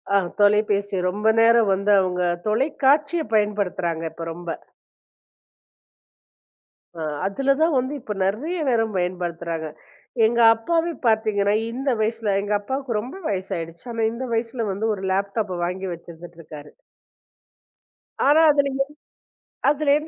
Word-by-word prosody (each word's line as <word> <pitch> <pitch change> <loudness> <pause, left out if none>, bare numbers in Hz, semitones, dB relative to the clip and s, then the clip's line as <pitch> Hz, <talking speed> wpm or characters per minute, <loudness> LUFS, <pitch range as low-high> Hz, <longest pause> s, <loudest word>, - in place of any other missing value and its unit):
அ - - +7 0.2
தொலைபேசி 205 -1 +2
ரொம்ப 205 +4 -1
நேரம் 230 -1 +5
வந்து 200 +2 0
அவுங்க 180 -1 -1 0.2
தொலைக்காட்சிய 285 +7 +2
பயன்படுத்துறாங்க 200 -6 0
இப்ப 165 0 -7
ரொம்ப. 175 0 -8 2.5
அ - - -4 0.2
அதுல 270 +8 +1
தான் 320 -2 +3
வந்து 260 +3 -3
இப்ப 215 - -5
நெறைய 260 - -1
நேரம் 225 -3 +1
பயன்படுத்துறாங்க. 170 -2 -3 0.6
எங்க 235 +2 +1 0.2
அப்பாவை 330 +9 0 0.2
பார்த்தீங்கன்னா, 215 -2 +2 0.2
இந்த 265 +4 -2
வயசுல, 220 -2 0
எங்க 205 +1 -2
அப்பாக்கு 260 -1 -2
ரொம்ப 245 - -7
வயசாயிடுச்சு. 185 0 -5 0.2
இந்த 245 +3 -5
வயசுல 230 0 -2
வந்து 220 +3 -2
ஒரு 195 - -9
லேப்டாப் 200 0 -1
வாங்கி 185 +2 -4
வச்சுகிட் 170 0 -12
இருக்காரு. 150 -2 -11 1.5
ஆனா 295 +3 +5
அதுல 285 -1 +2
என்ன 270 +1 0 0.9
அதுல 295 0 +2
என்ன? 305 +1 -6
210 Hz, 120 wpm, -23 LUFS, 185-255 Hz, 2.5 s, அ